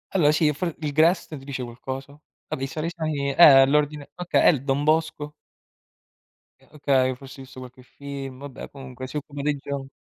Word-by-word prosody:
allora 150 -5 +5
sì, 150 -1 +2
f 170 +2 -3
il 150 -2 -3
Grest 160 +1 +2
ti 135 - -13
dice 130 -2 -5
qualcosa? 130 +4 -7 0.3
Vabbè, 135 - -4
i - - -1
Salesiani 155 -2 -3
eh, - - -6
è 135 -5 +9
l'ordine 150 +1 0
okay, 180 0 +1
e - - +9
il 135 -4 -3
Don 140 +1 0
Bosco? 155 -1 0 1.3
Eh - - -24
okay, 130 -3 +2
forse 135 0 -12
hai 135 - -9
visto 130 - -12
qualche 125 0 -12
film, 135 -1 -8
vabbè 140 -2 -9
comunque 130 -2 -9
si 140 - -11
occupa 145 -1 -5
dei 150 0 0
gio 140 -1 -6
140 Hz, 190 wpm, -24 LUFS, 135-150 Hz, 1.3 s, è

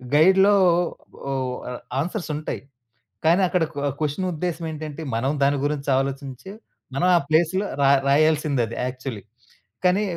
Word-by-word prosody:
గైడ్‌‌‌లో 190 +6 +6 0.7
ఓ - - -1 0.4
ఆహ్, 125 - -8 0.2
ఆన్‌సర్సుంటాయి. 155 -3 -4 0.7
కానీ, 175 +4 +5
అక్కడ 175 -1 +1
కొ - - -3 0.2
క్వెషనుద్దేశమేంటంటే 160 -1 -3
మనం 130 +5 0
దాని 140 +1 +3
గురించి 145 -1 -2
ఆలోచించి 135 +4 -5 0.4
మనం 180 - +2
ఆ - - +3
ప్లేస్‌లో 170 +5 +2 0.2
రా 135 - +5 0.2
రాయాల్సిందది 145 -5 +2
యాక్చలీ. 130 -5 -5 0.6
కానీ 185 +3 +3
155 Hz, 110 wpm, -23 LUFS, 140-175 Hz, 0.7 s, గైడ్‌‌‌లో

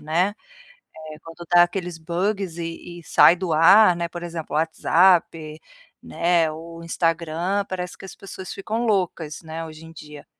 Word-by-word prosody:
né, 175 +7 0 0.8
eh, 155 - -13
quando 165 +1 -11
dá 175 - +8
aqueles 175 -1 -1
bugs 180 +2 -3
e 170 +1 -7
e - - -22
sai 170 - +5
do 180 -3 -3
ar, 180 +4 +6
né, 170 0 -3
por 175 0 -8
exemplo, 165 -3 -6
o 155 - +3
WhatsApp, 165 -1 +1 0.4
né, 170 -1 +1
o 165 +1 -10
Instagram, 170 +3 -1
parece 180 -2 -6
que - - -12
as 190 - -11
pessoas 190 -1 -9
ficam 220 +4 -4
loucas, 175 -6 -2
né, 160 +1 -6
hoje 160 0 -11
em 165 - -13
dia, 150 -2 -12
170 Hz, 165 wpm, -22 LUFS, 160-180 Hz, 0.8 s, dá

